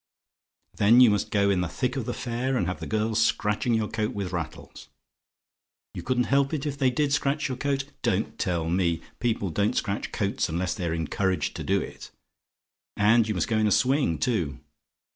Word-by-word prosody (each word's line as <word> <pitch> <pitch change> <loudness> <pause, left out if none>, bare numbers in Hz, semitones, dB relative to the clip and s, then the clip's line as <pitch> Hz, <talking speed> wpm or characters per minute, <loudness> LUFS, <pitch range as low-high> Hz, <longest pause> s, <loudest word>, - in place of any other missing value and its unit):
"Then 110 +4 +6
you 125 -4 +8
must 105 - 0
go 100 -2 +2
in 95 -2 +1
the 90 - -1
thick 125 - -2
of 130 -4 -3
the 120 - -1
fair, 125 +2 -2
and 90 - 0
have 90 +1 -3
the - - -6
girls 110 0 +1
scratching 105 +3 +1
your 110 -1 0
coat 110 0 -2
with 100 -3 -3
rattles! - - -6 1.0
"YOU - - -6
COULDN'T 125 -1 +1
HELP 140 +2 +2
IT, 145 - -4
IF 140 -1 -3
THEY 130 -2 +4
DID 140 +3 0
SCRATCH 145 0 0
YOUR 130 -2 -4
COAT? 140 0 -1 0.2
"Don't - - -1
tell 85 -2 -1
me; 85 -1 +1 0.2
people 110 -6 -1
don't 100 +5 0
scratch 100 0 -2
coats 100 -4 -1
unless 85 +2 -1
they're 85 -4 -2
encouraged 95 +3 -1
to - - -5
do - - +1
it. - - -8 0.9
And 110 +2 +4
you 105 - -1
must 90 - 0
go 110 -1 +1
in 110 - +3
a - - +1
swing, 130 - +2
too. 90 - -1
110 Hz, 200 wpm, -26 LUFS, 95-130 Hz, 1.0 s, you